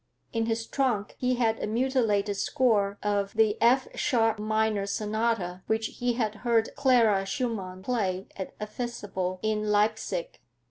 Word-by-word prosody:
In 225 -1 0
his 225 0 -1
trunk 240 -7 -1
he 250 0 +1
had 225 -2 +1
a - - -1
mutilated 220 -4 +1
score 205 -3 +1
of 200 -1 0
the 220 -1 +3
F 255 +3 +4
sharp 225 -5 +1
minor 215 -1 0
sonata, 210 -3 -1
which 220 0 -1
he 245 -1 +1
had 220 -3 -1
heard 230 -2 +2
Clara 240 -8 +4
Schumann 195 -3 -3
play 195 -6 -1
at 190 - -6
a 210 - -3
festival 205 -5 -4
in 215 -1 0
Leipsic. 210 - 0
220 Hz, 145 wpm, -28 LUFS, 205-235 Hz, -, F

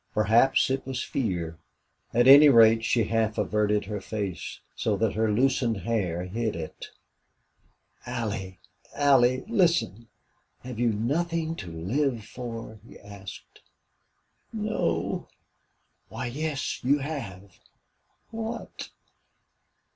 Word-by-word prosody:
Perhaps 115 +6 +3
it 135 - -1
was 130 -2 -4
fear. 85 -10 -3 0.5
At 120 +2 +3
any 145 +2 +10
rate, 115 -3 +6
she 115 0 +2
half 110 0 0
averted 105 0 +1
her 105 0 -5
face, 100 -4 -5 0.2
so 105 -3 0
that 110 +1 0
her 110 0 +1
loosened 125 -1 +1
hair 95 -7 -1
hid 110 +4 -3
it. 80 -2 -7 1.2
"Allie! 105 -6 -4 0.4
Allie! 130 -3 +4
Listen! 165 - +1 0.6
Have 125 -2 -7
you 120 -1 +2
nothing 160 +9 -1
to 90 - -7
LIVE 115 - -1
for?" 115 -2 -8
he - - -14
asked. 100 -1 -12 0.9
"No." 210 - -2 0.8
"Why, - - -5
yes, 145 +3 -3
you 140 +4 +3
have." 100 - -7 0.7
"What?" 225 +1 -6
115 Hz, 110 wpm, -26 LUFS, 105-135 Hz, 1.2 s, any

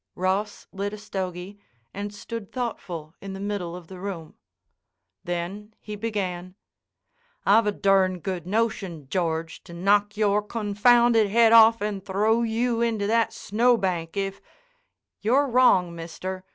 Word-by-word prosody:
Ross 195 +3 -1
lit 200 +1 -4
a - - -6
stogy 190 -1 -6 0.3
and 205 +1 -5
stood 210 0 -8
thoughtful 175 -10 -5
in 195 -1 -7
the 195 - -7
middle 195 -4 -3
of 180 -1 -10
the 185 +2 -11
room. 180 -5 -6 0.9
Then 190 +5 -5
he 210 - -7
began: 190 -4 -4 0.9
"I've 210 +2 +5
a - - +3
durn 195 -2 +2
good 180 -1 -5
notion, 195 -8 -2
George, 165 -1 -2
to 170 - -11
knock 205 +4 +1
your 210 -1 +2
confounded 225 +1 +3
head 230 +2 +5
off 225 0 +7
and 205 -2 -3
throw 210 +4 +1
you 230 +1 0
into 225 -3 0
that 230 +2 +2
snowbank, 200 -7 0
if—" 195 0 -3 0.8
"You're 255 +7 +3
wrong, 230 -9 +4
mister. 185 +3 -6
200 Hz, 140 wpm, -25 LUFS, 185-220 Hz, 0.9 s, off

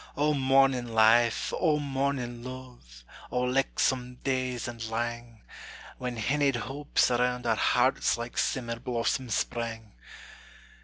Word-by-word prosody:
O 150 +1 +2
mornin' 135 -3 +2
life! 115 +1 +4
O 155 -4 +3
mornin' 135 -4 -2
luve! 125 - -11 0.3
O 125 - -1
lichtsome 125 -1 0
days 130 -3 -1
and 115 -2 -6
lang, 120 0 -4 0.6
When 125 -1 -4
hinnied 140 +4 +1
hopes 135 +3 0
around 125 0 0
our 115 -2 +2
hearts - - +2
Like 120 +1 -6
simmer 115 -3 -1
blossoms 120 -1 -1
sprang! 115 -2 -3
125 Hz, 115 wpm, -28 LUFS, 115-135 Hz, 0.6 s, life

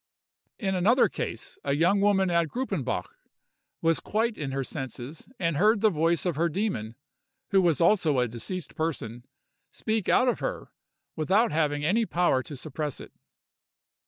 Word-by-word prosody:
In 195 -4 -1
another 200 +8 +4
case, - - -6
a 140 - 0
young 175 +7 +3
woman 195 -2 +3
at 170 -1 +2
Gruppenbach, 255 - -2 0.8
was 165 0 +3
quite 225 +1 -1
in 145 -7 -4
her 135 0 -2
senses, 130 +2 -7
and 165 -4 0
heard 210 +4 +4
the 220 -1 +4
voice 165 +1 +1
of 175 -4 0
her 170 +2 +2
demon 155 - -2 0.6
(who 195 -1 +5
was 170 -5 +2
also 170 -5 +3
a 125 -1 +2
deceased 120 +10 -6
person) 120 -7 -4 0.4
speak 220 -3 -2
out 255 - +4
of 245 - +1
her, - - -4 0.4
without 195 +9 +2
having 150 -2 0
any 220 +7 +2
power 170 -7 +2
to 145 +2 -8
suppress 150 0 -4
it. - - -11
170 Hz, 160 wpm, -27 LUFS, 145-205 Hz, 0.8 s, who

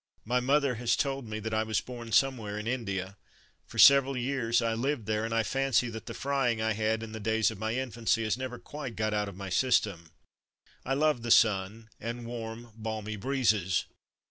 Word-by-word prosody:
My 125 +3 +1
mother 140 +1 +2
has 120 -1 +2
told 135 -3 -2
me 110 0 -4
that 110 +1 -4
I 110 - +2
was 110 -1 0
born 120 -2 -8
somewhere 115 -6 +1
in 105 - -5
India. 100 -6 -3 0.5
For - - -11
several 135 -1 +7
years 120 -2 +1
I 115 -1 0
lived 125 0 -1
there, 110 0 -1
and 115 - -4
I 115 0 +2
fancy 135 0 +1
that 110 -1 -8
the - - -6
frying 135 -5 0
I 110 0 +1
had 110 +1 0
in 110 - -7
the 110 - -6
days 110 +1 +1
of 110 - -9
my 110 +1 -2
infancy 120 -3 0
has 110 -1 0
never 130 -1 -5
quite 125 0 -7
got 110 +1 -1
out 105 -1 0
of 100 - -11
my 95 0 -6
system. 100 -7 +1 0.7
I 135 - -1
love 150 -3 +2
the 120 - -4
sun 110 +1 +3
and 115 +2 -5
warm, 115 0 -7
balmy 110 -1 -4
breezes. 105 -6 +1
115 Hz, 200 wpm, -29 LUFS, 110-125 Hz, 0.7 s, several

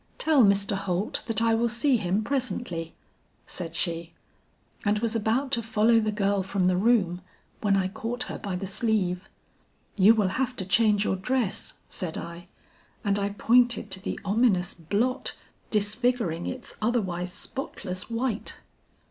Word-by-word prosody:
"'Tell 305 -5 +4
Mr. 200 0 +3
Holt 195 0 -1
that 225 -1 +4
I 230 0 +3
will 235 +1 +2
see 240 +3 +3
him 200 +1 0
presently,' 205 -10 -2 0.5
said 170 -2 -5
she, 170 -1 -2 0.7
and 210 0 +2
was 230 +1 -1
about 230 +5 0
to 235 - +2
follow 225 +1 +3
the 215 -1 0
girl 200 -1 +1
from 190 0 -1
the 185 0 +3
room 185 -4 +2 0.4
when 205 -2 +3
I 190 -1 +1
caught 230 +5 -3
her - - -6
by 195 -3 -4
the 185 +2 -4
sleeve. 190 -3 -1 0.7
"'You 215 +3 +6
will 210 -4 +2
have 255 +4 -1
to 190 - -4
change 210 +1 +3
your 190 - 0
dress,' 235 +1 -1
said 165 -3 -3
I, 170 +1 -8 0.6
and 200 -1 +1
I 200 0 0
pointed 235 +1 +2
to 190 0 -3
the - - -4
ominous 200 -4 +2
blot 210 - -1 0.3
disfiguring 210 -4 0
its 255 -1 -5
otherwise 190 -6 -1
spotless 185 -6 -4
white. 230 -1 -2
205 Hz, 155 wpm, -27 LUFS, 185-235 Hz, 0.7 s, You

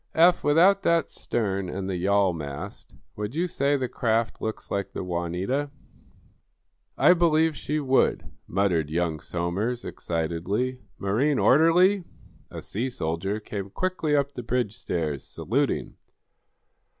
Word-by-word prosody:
Eph, 175 +2 +5
without 180 +7 +5
that 170 -1 +2
stern 100 -5 -2
and 95 +1 -4
the 95 - -2
yawl 95 +1 +2
mast, 70 -4 -7 0.2
would 105 +5 -4
you 170 +3 +1
say 145 -4 +1
the 130 -2 -1
craft 115 -2 -1
looks 110 0 -5
like 100 -1 -2
the - - -4
'Juanita'?" 90 +11 -2 1.3
"I 180 - +7
believe 160 -2 +3
she 150 +2 -2
would," 135 -2 +2 0.2
muttered 90 -5 +1
young 80 -1 -1
Somers, 95 +10 -2
excitedly. 85 +10 -2 0.2
"Marine 125 +9 +1
orderly!" 175 +7 +5 0.5
A - - -8
sea 120 +6 -3
soldier 95 -1 -2
came 100 -2 -6
quickly 175 - -1
up 140 0 +1
the 125 - -5
bridge 120 -3 -1
stairs, 75 -5 -3
saluting. - - -2
110 Hz, 130 wpm, -26 LUFS, 90-145 Hz, 1.3 s, I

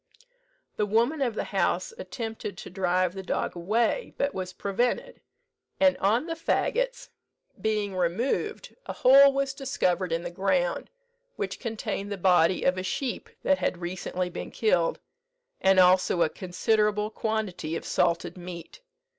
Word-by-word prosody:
The 210 - +1
woman 235 +9 +2
of 240 -5 0
the - - -1
house 470 - 0
attempted 225 - -6
to - - -9
drive 185 -1 +1
the 190 - -6
dog 185 - -2
away, 225 - 0
but 280 0 0
was 185 -1 -4
prevented; 200 +6 -2 0.6
and 280 -1 +5
on 220 +8 +2
the 330 - -3
fagots - - -1 0.5
being 210 -3 -1
removed 225 - -1
a - - -3
hole 275 +2 +7
was 275 0 -1
discovered 185 -10 -1
in 165 +1 -1
the 175 - -5
ground, - - 0 0.5
which - - -4
contained 220 -3 -4
the 200 - -3
body 180 -1 +3
of 180 0 +2
a - - -3
sheep 245 +7 -3
that 285 0 +3
had - - -1
recently 180 +1 -3
been - - -6
killed, 180 -7 +1 0.6
and 190 0 +5
also 180 -1 +5
a 160 - +1
considerable 210 +4 0
quantity 215 -8 -2
of - - -5
salted 175 0 0
meat. 175 - -9
200 Hz, 145 wpm, -27 LUFS, 180-245 Hz, 0.6 s, hole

